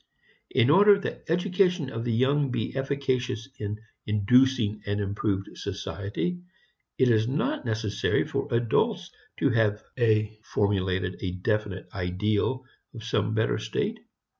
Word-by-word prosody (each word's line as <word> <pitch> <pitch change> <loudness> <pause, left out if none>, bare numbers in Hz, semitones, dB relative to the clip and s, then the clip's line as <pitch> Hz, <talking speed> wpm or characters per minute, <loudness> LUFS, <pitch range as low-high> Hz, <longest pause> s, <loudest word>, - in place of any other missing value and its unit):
In 130 +1 +3
order 200 +4 +7
that 200 - -6
education 180 -4 +1
of 115 0 -4
the 120 - -1
young 135 +4 +2
be 120 -1 -3
efficacious 135 -3 -1
in 105 0 -3 0.3
inducing 110 +1 +3
an 100 0 0
improved 100 -1 -1
society, 140 - -4 0.6
it 130 -2 +4
is 110 0 +3
not 225 - -1
necessary 110 -2 0
for - - -3
adults 170 - +1 0.3
to 140 - +2
have 105 -2 +1 0.2
a 110 -2 +2
formulated 95 -2 -1
definite 105 -3 -1
ideal 105 +7 -1 0.3
of 115 - -8
some 110 -1 0
better 110 0 +1
state. - - -2
115 Hz, 125 wpm, -27 LUFS, 105-135 Hz, 0.6 s, order